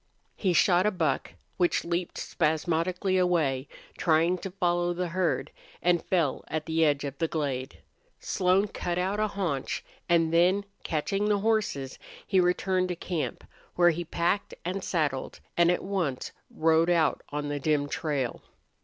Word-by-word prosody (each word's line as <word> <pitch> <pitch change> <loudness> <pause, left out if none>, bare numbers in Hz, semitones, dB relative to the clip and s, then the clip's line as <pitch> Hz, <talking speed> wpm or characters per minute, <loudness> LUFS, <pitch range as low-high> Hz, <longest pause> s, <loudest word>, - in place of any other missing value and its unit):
He 190 - +1
shot 180 +2 +4
a - - +5
buck, 165 -9 -1 0.2
which 175 -2 +2
leaped 170 +1 -2
spasmodically 170 +4 0
away, 155 -7 +1 0.3
trying 165 +2 +3
to 195 - -5
follow 175 -2 0
the 180 0 -2
herd, 180 0 0 0.3
and 175 -1 +2
fell 165 -7 0
at 155 0 -3
the 160 0 +1
edge 145 -2 +2
of 140 -1 -5
the 165 - +1
glade. 135 -5 -3 0.4
Slone 190 +2 +2
cut 175 -3 -3
out 190 +3 0
a 215 - +2
haunch, 180 -10 -3 0.2
and 165 -1 +3
then, 185 +4 +4 0.2
catching 195 +6 -1
the 205 - +3
horses, 205 -12 0 0.3
he 190 - +2
returned 185 +1 +2
to 180 - -3
camp, 170 -2 -3 0.3
where 175 0 +5
he 170 +2 -3
packed 170 +4 -1
and 185 +2 -2
saddled, 145 -6 -1 0.2
and 170 0 +4
at 180 - +1
once 180 -10 -2 0.2
rode 160 +1 +3
out 170 -3 +2
on 145 0 -3
the 145 0 -2
dim 145 0 +1
trail. 145 -5 -2
175 Hz, 155 wpm, -28 LUFS, 155-185 Hz, 0.4 s, a